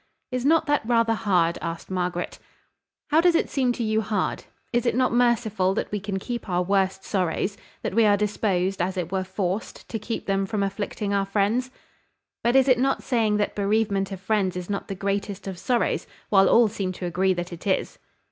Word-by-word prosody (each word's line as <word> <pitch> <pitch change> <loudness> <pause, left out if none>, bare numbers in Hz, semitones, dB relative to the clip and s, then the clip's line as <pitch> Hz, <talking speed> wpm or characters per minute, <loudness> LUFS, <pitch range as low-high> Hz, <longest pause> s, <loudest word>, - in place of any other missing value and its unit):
"Is 255 -1 -2
not 320 +3 +4
that 290 -1 +2
rather 230 0 +2
hard?" 180 -6 +1
asked 165 +3 -5
Margaret. 180 -1 -2 0.7
"How 315 +2 +5
does 350 -1 +4
it - - +1
seem 260 -3 +2
to 235 - -3
you 220 0 +1
hard? 210 -3 -2 0.3
Is 240 0 +1
it - - +2
not 255 -1 +2
merciful 225 -6 +2
that - - -2
we 210 - -1
can 200 0 -3
keep 235 +2 -5
our 180 0 +1
worst 190 0 +1
sorrows, 190 +1 -1 0.3
that - - -2
we 225 +1 +4
are 205 -1 +5
disposed, 195 -3 0
as 185 +2 -1
it 175 -1 -3
were 190 -1 0
forced, 190 +1 -4
to 225 - -3
keep 225 +2 -4
them 195 0 0
from 210 -1 -1
afflicting 200 +1 -3
our 195 -1 +1
friends?" 215 +6 +1 0.7
"But 240 +2 +2
is 270 0 +5
it 255 -2 +4
not 270 +1 +1
saying 220 -5 +1
that 205 - 0
bereavement 200 -1 0
of 190 - -5
friends 195 -2 0
is 180 +2 -5
not 200 - -3
the 195 - -4
greatest 200 +1 -3
of 190 -3 -6
sorrows, 245 +3 0 0.2
while 195 -2 +5
all 235 -1 +6
seem 200 -3 -3
to 180 - -6
agree 185 +2 +1
that 175 0 -4
it 170 - -8
is?" 190 - 0
200 Hz, 205 wpm, -25 LUFS, 190-230 Hz, 0.7 s, all